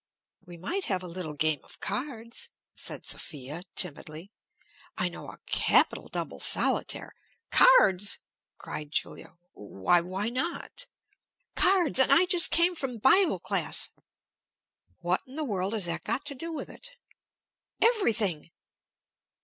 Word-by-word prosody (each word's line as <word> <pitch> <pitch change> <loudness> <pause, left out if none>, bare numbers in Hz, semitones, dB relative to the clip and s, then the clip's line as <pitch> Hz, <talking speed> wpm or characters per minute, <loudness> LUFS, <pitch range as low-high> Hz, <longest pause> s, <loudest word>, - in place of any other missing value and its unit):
"We 175 -1 -10
might 360 - -3
have 185 -2 -1
a - - -6
little 170 -3 -5
game 155 0 +1
of - - -16
cards," 235 - -4 0.2
said - - -4
Sophia, 145 +2 -4
timidly. 160 +2 0 0.7
"I - - +1
know - - -10
a - - -11
capital - - +2
double - - -5
solitaire - - +2 0.2
" 460 - -51
"Cards!" 205 - +5 0.4
cried 150 -1 -7
Julia. 155 - -4 0.2
"Why 100 - +1
why 190 +5 -3
not?" 335 - -3 0.7
"Cards! 365 -8 +3
And 265 - +5
I 330 +6 +6
just 355 -2 +2
came 340 +2 +4
from 270 -7 -4
bible 335 - +4
class!" - - -1 1.1
"What 175 +1 0
in 260 - -12
the 310 0 -1
world 195 -4 -2
has 210 -5 +2
that 170 -1 -3
got 280 - -2
to 290 - 0
do 330 +5 -5
with 320 - -5
it?" - - -13 0.9
"Everything!" 220 - +1
215 Hz, 135 wpm, -28 LUFS, -, 1.1 s, I